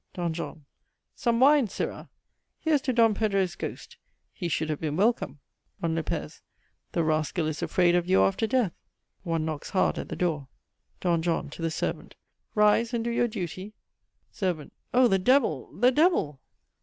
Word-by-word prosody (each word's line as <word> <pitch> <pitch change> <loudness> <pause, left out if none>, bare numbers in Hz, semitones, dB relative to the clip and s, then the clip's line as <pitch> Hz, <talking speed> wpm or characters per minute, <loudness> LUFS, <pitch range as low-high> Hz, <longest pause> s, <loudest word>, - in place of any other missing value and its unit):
"D. 175 -1 -1
JOHN. 160 -2 -6 0.5
Some 235 -3 +1
wine, 280 -1 +6
sirrah! - - -5 0.5
Here's 310 -4 +2
to 265 - 0
Don 230 -2 +4
Pedro's 195 -4 0
ghost - - -7 0.4
he 175 - -4
should 160 -1 -1
have 150 - -4
been 150 -2 -2
welcome. 200 - +1 0.4
"D. 170 - -1
LOP. 165 -1 -2 0.8
The 170 - +1
rascal 155 +2 0
is 155 -1 -3
afraid 180 -2 +3
of 175 0 +1
you 190 - +5
after 195 +3 +1
death. 240 -7 +1 0.5
(One 165 -3 -1
knocks 155 -2 -4
hard 190 - +1
at - - -6
the - - -4
door.) 155 -6 -1 0.5
"D. 175 -2 +2
JOHN. 165 -3 -1
(to 165 - -9
the 165 - 0
servant) 160 - -4 0.4
Rise 215 +3 +3
and 230 - -1
do 235 - -1
your 240 +1 +2
duty. 200 -1 -6 0.6
"SERV. 180 -7 -2 0.2
Oh 250 0 +5
the 195 -3 +2
devil, 225 - +2
the 250 +1 +5
devil! 260 - +2
185 Hz, 170 wpm, -27 LUFS, 160-230 Hz, 0.8 s, wine